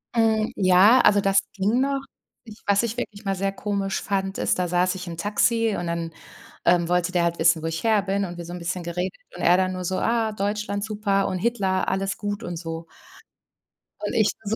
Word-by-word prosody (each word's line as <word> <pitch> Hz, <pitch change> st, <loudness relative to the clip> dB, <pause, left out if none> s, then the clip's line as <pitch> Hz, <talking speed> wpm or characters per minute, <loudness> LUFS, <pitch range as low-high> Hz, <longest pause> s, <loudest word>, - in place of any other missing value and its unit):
Hm, 220 Hz, -1 st, +2 dB
ja. 195 Hz, +6 st, +6 dB
Also, 205 Hz, -1 st, +5 dB
das 195 Hz, 0 st, +4 dB, 0.2 s
ging 205 Hz, +5 st, +1 dB
noch. 275 Hz, 0 st, 0 dB, 0.4 s
Ich 220 Hz, -2 st, -13 dB
was 200 Hz, 0 st, +3 dB
ich 230 Hz, -1 st, -2 dB
wirklich 210 Hz, -3 st, -6 dB
mal 195 Hz, 0 st, 0 dB
sehr 195 Hz, +1 st, -1 dB
komisch 195 Hz, -1 st, -2 dB
fand, 195 Hz, -1 st, -2 dB
ist, -, -, +1 dB
da 180 Hz, -1 st, -1 dB
saß 180 Hz, +2 st, +1 dB
ich 185 Hz, -1 st, -6 dB
im 170 Hz, -1 st, -6 dB
Taxi 220 Hz, +3 st, +1 dB
und 175 Hz, -, -3 dB
dann, 170 Hz, -1 st, -3 dB, 0.5 s
ähm, 170 Hz, -1 st, +4 dB
wollte 180 Hz, 0 st, +1 dB
der 175 Hz, -2 st, +1 dB
halt 170 Hz, 0 st, -1 dB
wissen, 165 Hz, -1 st, +4 dB
wo -, -, -6 dB
ich 165 Hz, 0 st, -3 dB
her 220 Hz, -2 st, +3 dB
bin, 200 Hz, 0 st, -1 dB
und 175 Hz, -1 st, -7 dB
wir 170 Hz, -, -6 dB
so 175 Hz, -, -8 dB
'n 180 Hz, -, -6 dB
bisschen 175 Hz, +1 st, -3 dB
geredet 180 Hz, +2 st, -3 dB, 0.2 s
und -, -, -7 dB
er 175 Hz, +1 st, +5 dB
dann 185 Hz, 0 st, +1 dB
nur 185 Hz, -, -5 dB
so: 185 Hz, +1 st, -1 dB
„Ah, 230 Hz, -1 st, +1 dB
Deutschland 205 Hz, 0 st, -2 dB
super 205 Hz, -2 st, 0 dB
und 185 Hz, -, -2 dB
Hitler 195 Hz, -3 st, 0 dB
alles 195 Hz, 0 st, -1 dB
gut,“ 205 Hz, +1 st, -4 dB
und 175 Hz, -, -5 dB
so. 165 Hz, 0 st, -6 dB, 1.2 s
Und -, -, -3 dB
ich 215 Hz, -2 st, +3 dB
nur 215 Hz, +1 st, -1 dB
195 Hz, 225 wpm, -24 LUFS, 180-210 Hz, 1.2 s, ja